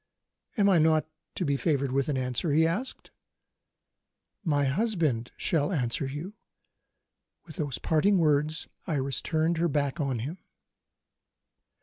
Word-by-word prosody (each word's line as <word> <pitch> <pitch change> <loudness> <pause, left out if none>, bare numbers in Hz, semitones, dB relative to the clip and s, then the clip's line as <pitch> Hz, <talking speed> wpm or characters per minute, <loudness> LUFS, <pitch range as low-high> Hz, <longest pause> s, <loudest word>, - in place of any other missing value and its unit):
"Am 200 -2 +4
I 185 -4 +5
not 155 -1 +3 0.3
to 180 - -1
be 140 -1 +1
favoured 140 -4 0
with 135 +2 0
an 140 - 0
answer?" 130 +5 0
he 160 +3 +4
asked. 200 +11 -3 1.3
"My 145 -5 +2
husband 155 - 0
shall 155 +1 +1
answer 130 -4 0
you." 150 +9 -6 1.1
With 155 -4 -11
those 145 -5 -2
parting 190 +6 +2
words, 155 -1 +1 0.2
Iris 140 -3 -1
turned 160 +1 0
her 170 - +3
back 140 -1 -1
on 135 -4 0
him. 145 +11 -5
155 Hz, 130 wpm, -28 LUFS, 140-170 Hz, 1.3 s, I